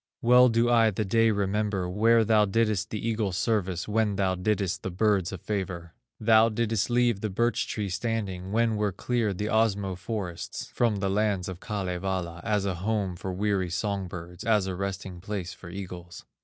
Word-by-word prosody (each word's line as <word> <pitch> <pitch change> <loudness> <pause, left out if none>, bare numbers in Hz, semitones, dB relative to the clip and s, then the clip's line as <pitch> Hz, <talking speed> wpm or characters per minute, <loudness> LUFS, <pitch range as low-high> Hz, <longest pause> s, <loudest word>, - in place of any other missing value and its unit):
Well 125 +1 +7
do 115 +1 +2
I 115 -2 +5
the 105 +1 -2
day 115 +3 +3
remember 100 -2 0
Where 110 +4 +3
thou 105 -1 +4
didst 105 0 0
the 110 +1 -4
eagle 110 -3 0
service, 95 -2 -1
When 105 -1 +1
thou 95 -1 +1
didst 95 0 -1
the - - -3
birds 95 -1 +1
a 95 - -5
favor. 90 -3 -4 0.3
Thou 110 +1 +5
didst 110 -1 0
leave 120 -4 +2
the 110 - -1
birch 120 +5 0
tree 105 -2 -3
standing, 95 -2 -3
When 115 0 +2
were 105 -1 +1
cleared 110 0 -1
the 105 +2 -2
Osmo 100 -4 +1
forests, 95 -3 -5
From 115 -3 +2
the 100 -1 -1
lands 100 -2 0
of 95 -2 -6
Kalevala, 95 -4 -3
As 105 -3 0
a 95 - 0
home 95 0 -1
for 95 +2 -5
weary 95 -1 0
song 95 +2 -2
birds, 90 0 -8
As 105 -3 +2
a 95 - -3
resting 95 -1 -5
place 95 -2 -4
for 85 - -11
eagles." 90 -2 -8
100 Hz, 185 wpm, -27 LUFS, 95-110 Hz, 0.3 s, Well